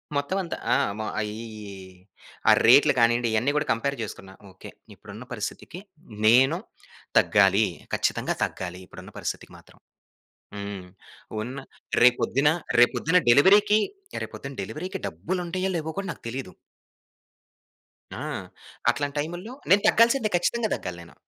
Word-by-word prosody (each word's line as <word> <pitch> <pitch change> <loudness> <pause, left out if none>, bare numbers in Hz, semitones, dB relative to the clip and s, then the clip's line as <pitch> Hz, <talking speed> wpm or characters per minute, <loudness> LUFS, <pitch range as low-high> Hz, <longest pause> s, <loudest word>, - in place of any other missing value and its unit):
మొత్తమంత 170 +5 -2 0.2
ఆ! - - +4 0.2
మా 110 - -3
అయియి 110 0 -6 0.8
ఆ - - +9
రేట్‌లు 140 +6 +7
కానీండి, 120 +1 +3
ఇయన్ని 120 +6 +2
గూడా 150 0 0
కంపేర్ 140 +5 -2
చేసుకున్న. 95 -3 -7 0.2
ఓకె. 95 - -12 0.2
ఇప్పుడున్న - - -11
పరిస్థితికి 175 - -6 0.5
నేను 130 +8 +5 0.6
తగ్గాలి. 100 +1 +4 0.3
కచ్చితంగా - - 0
తగ్గాలి, 90 -1 -4
ఇప్పుడున్న - - -12
పరిస్థితికి - - -5
మాత్రం. - - -20 0.8
హ్మ్. 100 -2 -6 0.6
ఉన్న 125 +5 -6 0.5
రేపొద్దున, 125 +3 +4 0.3
రేపొద్దున 165 +8 +3
డెలివరీకి 205 - +6 0.5
రేపొద్దున 140 - -8
డెలివరీకి 165 - -5
డబ్బులుంటాయో 180 - -3
లేవో 160 -1 -3
కూడా 195 -1 -4
నాకు - - -9
తెలీదు. 125 -4 -6 1.7
ఆ! - - -5 0.7
అట్లాంటి 145 0 -1
టైము‌ల్లో, 175 +9 -5 0.2
నేను 200 +2 +6
తగ్గాల్సిందే 230 0 +4
ఖచ్చితంగా 220 +5 0
తగ్గాలి 90 -1 -6
నేను. 85 - -16
140 Hz, 115 wpm, -25 LUFS, 110-180 Hz, 1.7 s, ఆ